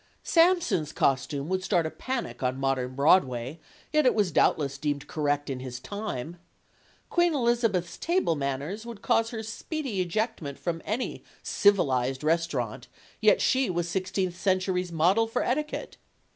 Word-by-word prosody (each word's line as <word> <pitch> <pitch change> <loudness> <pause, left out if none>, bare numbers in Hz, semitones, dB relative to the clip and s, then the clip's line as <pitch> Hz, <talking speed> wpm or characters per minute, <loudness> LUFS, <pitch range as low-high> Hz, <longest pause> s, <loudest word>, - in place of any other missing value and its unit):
Samson's 330 - +3
costume 140 +1 0
would 185 0 -1
start 175 -4 +1
a 160 - -3
panic 260 -2 -4
on 130 0 0
modern 130 -2 -1
Broadway, 140 -2 +2 0.3
yet 305 0 +4
it - - +3
was 205 -5 +2
doubtless 140 -3 +2
deemed 145 -1 -2
correct 145 -1 -1
in 135 -2 -3
his 125 -1 -6
time. 170 - -5 0.7
Queen 345 -2 +3
Elizabeth's 230 -9 +1
table 340 - +1
manners 145 +9 -3
would 235 -3 -9
cause 225 0 +2
her 225 -2 -5
speedy 230 - -3
ejectment 175 - -2
from 165 -2 -3
any 225 +5 -3 0.2
civilized 135 -10 +2
restaurant, 165 +2 -1 0.3
yet - - +5
she 260 -1 +2
was 175 -1 -1
sixteenth 185 0 -2
century's 185 -1 0
model 180 +8 +3
for 230 +2 -1
etiquette. 300 +5 -2
180 Hz, 145 wpm, -27 LUFS, 145-225 Hz, 0.7 s, yet